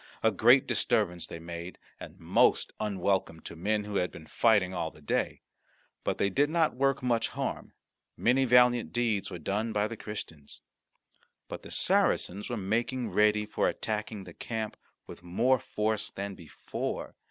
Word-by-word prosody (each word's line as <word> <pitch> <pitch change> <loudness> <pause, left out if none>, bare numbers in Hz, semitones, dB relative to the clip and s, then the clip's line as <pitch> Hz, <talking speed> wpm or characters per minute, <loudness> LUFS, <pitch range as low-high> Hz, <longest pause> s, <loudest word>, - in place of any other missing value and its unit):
A 110 - +5
great 120 +6 +5
disturbance 90 -7 +1
they - - -7
made, 85 +2 -7 0.2
and - - -10
most - - +3
unwelcome 95 -5 0
to - - -8
men 105 +5 0
who 105 -1 -3
had 90 - +1
been 80 - -12
fighting 100 -1 +3
all 85 -3 -2
the 75 - -18
day. 75 - -2 0.6
But - - -1
they 100 - +1
did 145 +9 +2
not 165 -1 +2
work 135 +1 +1
much 120 -2 +1
harm. - - -4 0.4
Many 130 +3 +3
valiant 120 -7 +4
deeds 110 -4 0
were 90 - -6
done 105 +7 -2
by 105 0 +1
the 115 - -6
Christians. 80 -10 -8 0.8
But - - -7
the - - -11
Saracens 100 +4 +1
were 120 - -2
making 115 +5 -1
ready 105 0 +3
for - - 0
attacking 105 -1 -3
the - - -11
camp 110 -2 -4 0.3
with - - -11
more 120 +9 +2
force 105 -1 -2
than 100 0 -5
before. 85 -5 -5
105 Hz, 165 wpm, -29 LUFS, 95-120 Hz, 0.8 s, A